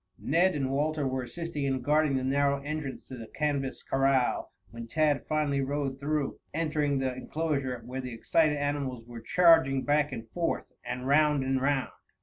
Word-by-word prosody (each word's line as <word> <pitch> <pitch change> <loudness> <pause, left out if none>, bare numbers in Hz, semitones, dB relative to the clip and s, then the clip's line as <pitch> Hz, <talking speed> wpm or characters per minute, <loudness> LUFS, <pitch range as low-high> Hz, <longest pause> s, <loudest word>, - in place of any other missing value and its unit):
Ned 175 +4 +2
and 135 -2 -1
Walter 150 +1 0
were 130 0 -1
assisting 160 +2 -4
in 135 -1 0
guarding 150 -1 +3
the 130 - -2
narrow 140 +1 +2
entrance 150 -2 -5
to 130 - -7
the 115 -2 -8
canvas 140 -2 -2
corral 135 -2 +1 0.2
when 115 0 -8
Tad 150 +2 +1
finally 150 -3 +1
rode 135 -1 -2
through, 145 0 -2 0.2
entering 150 -3 0
the 130 -1 -1
enclosure, 130 -2 -2
where 130 +2 -5
the 125 -1 -6
excited 150 +6 +2
animals 140 -4 -2
were 120 -1 -9
charging 160 -2 +4
back 145 0 +2
and 115 -3 -6
forth 170 -1 -1 0.2
and 125 +1 -5
round 150 0 +3
and 130 0 0
round. 140 -1 +1
140 Hz, 170 wpm, -29 LUFS, 130-150 Hz, 0.2 s, charging